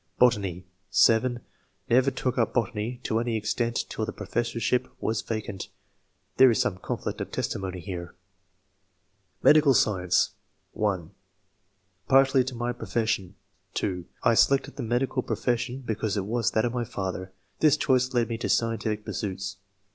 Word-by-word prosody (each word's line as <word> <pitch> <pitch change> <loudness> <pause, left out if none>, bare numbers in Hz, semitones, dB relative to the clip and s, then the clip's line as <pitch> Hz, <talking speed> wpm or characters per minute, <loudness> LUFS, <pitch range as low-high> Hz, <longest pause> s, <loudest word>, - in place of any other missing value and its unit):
Botany. 100 -7 +2 0.2
— - - -45 0.2
(7) 120 +2 +1 0.5
Never 130 +3 +4
took 130 -1 -2
up 115 -4 0
botany 120 0 -1
to 110 - 0
any 115 -1 -1
extent 115 +2 -1
till 110 - -4
the - - -2
professorship 120 +3 -1
was 110 0 -1
vacant. 110 -3 -4 0.7
[There 130 0 +8
is 115 - +2
some 95 - 0
conflict - - -4
of - - -5
testimony 95 -1 -3
here.] 90 -1 -6 1.3
Medical 150 -3 +6
Science. 95 -3 +2 0.2
— 95 -1 -45
(1) 95 -5 -1 1.0
Partly 135 0 +5
to 130 -1 -5
my 120 +1 -2
profession. 110 -4 -2 0.4
(2) 90 -2 -2 0.2
I - - +5
selected 135 +4 +3
the - - -5
medical 125 +3 0
profession 125 +1 -1
because 110 -2 -1
it 95 - -1
was 115 +2 0
that 110 - +1
of 120 - -1
my 120 -1 -1
father; 95 -3 -4 0.3
this 155 -1 +5
choice 130 -3 +2
led 120 -2 +1
me 115 -1 -4
to - - -2
scientific 110 -2 0
pursuits. 95 -2 -4
115 Hz, 150 wpm, -27 LUFS, 100-125 Hz, 1.3 s, There